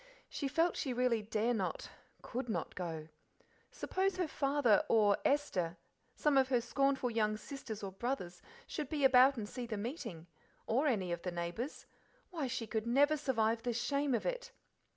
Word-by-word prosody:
She 280 - -3
felt 330 +5 +2
she 265 - -2
really 245 -2 +2
dare 220 +3 0
not, 195 -5 -3 0.3
could 250 0 -4
not 215 - -2
go. 160 -3 -5 0.6
Suppose 385 +1 -1
her 365 -2 0
father 275 -7 +3
or 210 -3 +5
Esther, 180 -12 +1 0.4
some 290 -3 +3
of 265 - +3
her 250 -2 +3
scornful 270 +1 +1
young 215 -2 +1
sisters 220 -3 -7
or 195 - -4
brothers, 195 -4 -4 0.2
should 300 -5 -4
be 295 -3 -1
about 265 +1 +7
and 210 -2 -3
see 245 +2 -6
the 220 -2 -3
meeting, 220 - -5 0.4
or 265 +7 +2
any 195 -9 0
of 170 0 -2
the 180 - -3
neighbours 175 - -4 0.5
why, 315 -6 -2
she 245 -2 -3
could 220 +1 -2
never 285 +5 +4
survive 230 -6 +1
the 240 0 -1
shame 275 +3 0
of - - -2
it! - - -3
245 Hz, 170 wpm, -34 LUFS, 215-280 Hz, 0.6 s, about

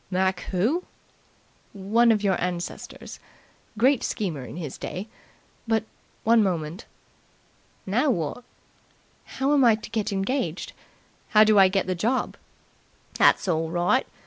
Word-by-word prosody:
"Mac 190 0 0
Who?" 230 - 0 0.9
"One 220 +4 +3
of 210 -2 +1
your 195 -2 +2
ancestors. 175 -1 -5 0.6
Great 260 +3 +3
schemer 165 -10 -3
in 125 - -9
his 155 -7 -6
day. 190 +4 -5 0.6
But, 225 -1 +1 0.4
one 230 0 +5
moment." 175 -1 -2 1.0
"Now 240 +9 +1
what?" 175 - -2 0.9
"How 270 +2 +2
am 280 -2 +4
I 230 -3 +6
to 215 - -11
get 220 -2 -1
engaged? 195 - -2 0.6
How 215 0 +6
do 215 -1 +5
I 190 - +8
get 190 0 0
the 185 - -1
job?" 230 +9 -1 0.8
"That's - - +3
orl 160 -2 0
right. 175 +10 +1
200 Hz, 130 wpm, -25 LUFS, 180-230 Hz, 1.0 s, I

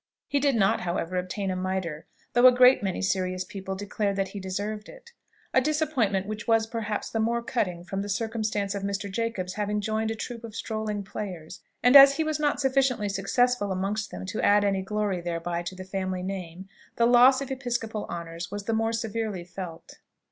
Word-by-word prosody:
He 285 - +1
did 280 -2 +2
not, 195 -3 +3
however, 175 0 -2
obtain 185 +2 -2
a - - -2
mitre, 185 -4 -3 0.3
though 245 +1 +7
a - - +9
great 250 +1 +6
many 195 -1 -2
serious 185 -1 0
people 190 0 -6
declared 200 0 -2
that 195 -1 -1
he 200 - -7
deserved 205 +3 -4
it: - - -14 0.4
a 260 - +5
disappointment 270 -10 +1
which 215 +1 -6
was 225 -1 +4
perhaps 220 -2 -4
the 225 - -1
more 235 +1 0
cutting 180 -9 -2
from 195 +2 -4
the 205 - -5
circumstance 215 -1 -1
of 200 - -3
Mr. 200 0 -3
Jacob's 200 -4 -2
having 210 0 -1
joined 220 +1 -1
a 225 - -2
troop 235 +1 -6
of 225 -2 -9
strolling 215 -3 -3
players; 190 -5 -7 0.2
and 250 +3 +5
as 275 0 +10
he 320 - +1
was 310 -1 -1
not 295 -2 +1
sufficiently 265 -6 +1
successful 205 +2 +1
amongst 200 +3 -2
them - - -7
to 205 +3 -3
add 205 0 +4
any 195 -1 +1
glory 200 -2 -1
thereby 170 0 -3
to 175 +2 -6
the 185 0 -8
family 185 -1 -3
name, 185 -1 -6 0.3
the 235 - +3
loss 250 +2 +6
of 275 -1 -5
episcopal 235 -5 -3
honours 170 0 -6
was 205 0 -5
the 225 - -1
more 225 +1 +1
severely 225 -4 -3
felt. 175 -2 -9
205 Hz, 200 wpm, -27 LUFS, 190-230 Hz, 0.4 s, as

